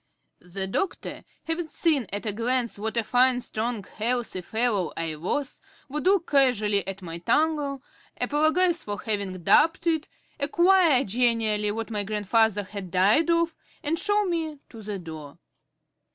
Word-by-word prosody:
The 185 Hz, +2 st, -5 dB
doctor, 350 Hz, -, -3 dB, 0.2 s
having 325 Hz, 0 st, -2 dB
seen 300 Hz, -, +1 dB
at 205 Hz, +3 st, -4 dB
a 215 Hz, -, 0 dB
glance 235 Hz, 0 st, -1 dB
what 220 Hz, +2 st, -3 dB
a 230 Hz, -, +2 dB
fine 250 Hz, +2 st, +3 dB
strong 230 Hz, -2 st, -3 dB
healthy 230 Hz, -1 st, -2 dB
fellow 220 Hz, -3 st, 0 dB
I 165 Hz, -1 st, -2 dB
was, 265 Hz, -, -3 dB, 0.3 s
would 300 Hz, +4 st, -4 dB
look 380 Hz, -2 st, +2 dB
casually 215 Hz, -, +3 dB
at 195 Hz, 0 st, -6 dB
my 170 Hz, -1 st, -6 dB
tongue, 285 Hz, -, 0 dB, 0.4 s
apologise 320 Hz, +4 st, +2 dB
for 205 Hz, -2 st, -5 dB
having 200 Hz, -5 st, -3 dB
doubted 325 Hz, -, +4 dB
it, 320 Hz, -2 st, +1 dB, 0.3 s
enquire 335 Hz, -1 st, +4 dB
genially 220 Hz, -2 st, +1 dB
what 225 Hz, +2 st, -4 dB
my 210 Hz, -2 st, -1 dB
grandfather 210 Hz, +1 st, +1 dB
had 195 Hz, -1 st, -8 dB
died 200 Hz, -, +3 dB
of, 335 Hz, 0 st, +2 dB, 0.3 s
and 325 Hz, +3 st, -1 dB
show 415 Hz, 0 st, +2 dB
me 325 Hz, -4 st, -2 dB
to 225 Hz, -, -11 dB
the 205 Hz, -1 st, -5 dB
door. 160 Hz, -5 st, -9 dB
235 Hz, 150 wpm, -26 LUFS, 205-305 Hz, 0.4 s, doubted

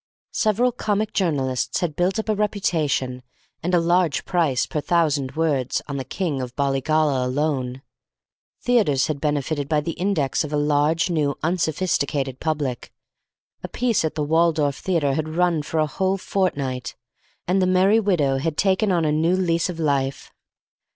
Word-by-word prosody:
Several 225 Hz, +4 st, +2 dB
comic 215 Hz, -3 st, -1 dB
journalists 140 Hz, -, 0 dB
had 165 Hz, -4 st, -2 dB
built 180 Hz, +3 st, +1 dB
up 220 Hz, -, -3 dB
a 215 Hz, -, +2 dB
reputation 160 Hz, -11 st, -1 dB, 0.4 s
and 180 Hz, +2 st, +1 dB
a -, -, +5 dB
large 170 Hz, -2 st, +1 dB
price 160 Hz, -9 st, +1 dB
per 150 Hz, -, -3 dB
thousand 150 Hz, -6 st, +1 dB
words 145 Hz, -6 st, 0 dB
on 140 Hz, -1 st, -4 dB
the 135 Hz, -, -3 dB
King 145 Hz, 0 st, -3 dB
of 125 Hz, -1 st, -6 dB
Bollygolla 140 Hz, 0 st, +1 dB
alone. 130 Hz, -1 st, -2 dB, 0.8 s
Theatres 205 Hz, -, +3 dB
had 145 Hz, -3 st, -3 dB
benefited 145 Hz, -1 st, -1 dB
by 155 Hz, -, +2 dB
the 150 Hz, +3 st, -3 dB
index 175 Hz, -6 st, 0 dB
of 150 Hz, -, -6 dB
a 150 Hz, -, 0 dB
large, 150 Hz, +4 st, +2 dB
new, 150 Hz, -4 st, 0 dB
unsophisticated 160 Hz, -5 st, -1 dB
public. 145 Hz, -6 st, -3 dB, 0.7 s
A -, -, -5 dB
piece 240 Hz, -6 st, 0 dB
at 160 Hz, -, -2 dB
the 150 Hz, -, -1 dB
Waldorf 155 Hz, -2 st, +2 dB
Theatre 160 Hz, -7 st, 0 dB
had 155 Hz, +2 st, -3 dB
run 175 Hz, -3 st, +2 dB
for 155 Hz, +2 st, -3 dB
a 155 Hz, -, +3 dB
whole 190 Hz, +6 st, -1 dB
fortnight, 140 Hz, -11 st, -2 dB, 0.5 s
and 185 Hz, +2 st, +2 dB
"The 185 Hz, -, +2 dB
Merry 190 Hz, +4 st, +4 dB
Widow" 155 Hz, -11 st, +1 dB
had 160 Hz, +2 st, -2 dB
taken 195 Hz, +1 st, +2 dB
on 170 Hz, -3 st, +2 dB
a 150 Hz, -, +2 dB
new 160 Hz, +4 st, +2 dB
lease 170 Hz, -2 st, +1 dB
of 170 Hz, -2 st, -5 dB
life. 140 Hz, -3 st, -1 dB
155 Hz, 165 wpm, -23 LUFS, 140-180 Hz, 0.8 s, a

